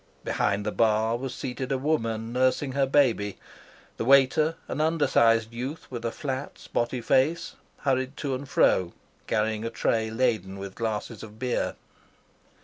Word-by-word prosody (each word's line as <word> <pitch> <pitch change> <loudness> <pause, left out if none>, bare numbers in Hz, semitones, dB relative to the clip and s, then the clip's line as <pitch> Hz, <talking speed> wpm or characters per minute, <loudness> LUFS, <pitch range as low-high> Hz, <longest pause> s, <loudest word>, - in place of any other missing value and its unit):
Behind 100 +1 0
the 105 - 0
bar 110 +1 +2
was 130 +2 -4
seated 130 0 -5
a 135 - +2
woman 115 -6 -1
nursing 130 +2 +1
her 135 0 +1
baby. 120 -8 +2 0.6
The - - -2
waiter, 140 +4 +5
an 150 - -2
undersized 115 -8 +3
youth 130 +7 -5
with 120 -2 -5
a 115 - -1
flat, 135 0 -4
spotty 120 +1 -2
face, 135 +8 +1 0.3
hurried 130 0 0
to 140 -3 -2
and 130 +1 -5
fro 90 -9 +3 0.3
carrying 110 0 0
a 115 - -2
tray 115 -1 0
laden 110 -5 0
with 100 -1 -7
glasses 110 0 -3
of 110 -1 -11
beer. 125 +1 -1
120 Hz, 150 wpm, -27 LUFS, 110-135 Hz, 0.6 s, waiter